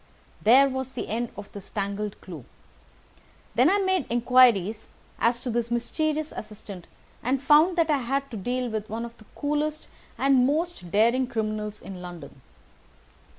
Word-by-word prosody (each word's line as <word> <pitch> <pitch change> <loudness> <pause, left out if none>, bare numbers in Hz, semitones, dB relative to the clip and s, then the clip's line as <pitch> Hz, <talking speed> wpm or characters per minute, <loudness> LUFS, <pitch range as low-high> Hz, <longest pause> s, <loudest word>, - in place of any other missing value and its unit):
There 260 +6 +6
was 265 -1 -4
the 250 - -5
end 235 +2 -2
of 205 -1 -9
this 200 -2 -10
tangled 200 0 -3
clue. 165 -8 -9 1.1
Then 250 +7 +5
I 395 - +3
made 375 -6 +1
inquiries 235 -4 +4 0.3
as 235 +1 +2
to 250 - -3
this 235 0 -1
mysterious 305 +6 -1
assistant 205 -4 -9 0.3
and 260 +3 0
found 305 +6 +5
that 325 -2 +3
I 290 - +2
had 275 +2 -2
to - - -6
deal 250 +5 -2
with 215 -1 -4
one 225 +2 -3
of 235 0 -10
the 215 - -16
coolest 300 +1 -2 0.3
and 265 -2 +4
most 315 - -2
daring 235 +7 +3
criminals 215 -2 -3
in 190 -2 -8
London. 175 -6 -10
240 Hz, 155 wpm, -26 LUFS, 210-275 Hz, 1.1 s, There